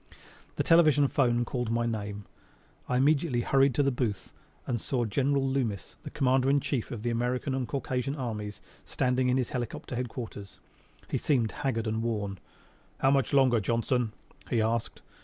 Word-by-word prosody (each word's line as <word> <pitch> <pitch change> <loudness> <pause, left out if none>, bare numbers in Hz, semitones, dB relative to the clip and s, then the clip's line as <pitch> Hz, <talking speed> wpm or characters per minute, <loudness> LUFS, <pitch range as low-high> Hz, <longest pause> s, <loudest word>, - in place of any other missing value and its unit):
The - - 0
television 155 -4 +5
'phone 120 -3 +2
called 125 -2 -2
my 115 +1 +1
name. 105 -3 -4 0.6
I 125 - +2
immediately 140 -1 +2
hurried 135 0 +3
to 145 - +3
the 140 - +2
booth 120 -5 -3 0.3
and 120 -3 -2
saw 125 -3 -1
General 135 +5 +1
Loomis, 120 -9 -2
the - - -7
Commander 130 -1 +2
in 140 +1 +4
Chief 130 -4 -2
of 110 -3 -6
the 120 - 0
American 125 +3 -1
and 130 -2 -1
Caucasian 130 +1 -2
Armies, 110 -6 -5 0.2
standing 125 0 0
in 125 - +2
his 125 -3 0
helicopter 120 0 -4
headquarters. 115 -5 -6 0.5
He - - -1
seemed 120 -7 +1
haggard 115 -1 -2
and 110 0 -1
worn. 105 -4 -2 0.6
"How 135 - +3
much 135 -4 +2
longer, 130 -4 +4
Johnson?" 115 +2 0 0.4
he 120 - +1
asked. 115 +1 -1
125 Hz, 165 wpm, -29 LUFS, 115-135 Hz, 0.6 s, television